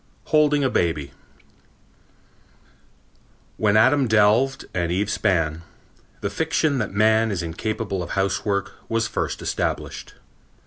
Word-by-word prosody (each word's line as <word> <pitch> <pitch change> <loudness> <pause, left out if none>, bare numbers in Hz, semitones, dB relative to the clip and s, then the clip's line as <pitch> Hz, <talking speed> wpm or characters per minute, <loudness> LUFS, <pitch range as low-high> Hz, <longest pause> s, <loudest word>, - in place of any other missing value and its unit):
Holding 150 -2 +3
a 130 - +2
Baby 80 - -1 2.5
When 105 -1 +3
Adam 130 +4 +4
delved 110 +5 +3
and 85 -1 -1
Eve 100 +3 0
span, 80 -7 0 0.6
the 100 - -1
fiction 155 +2 0
that 110 - -2
man 110 +2 +3
is 95 -4 -2
incapable 100 +3 -3
of 85 - -6
housework 100 +1 0 0.2
was 115 0 +1
first - - -3
established. - - -3
105 Hz, 115 wpm, -23 LUFS, 95-115 Hz, 2.5 s, Adam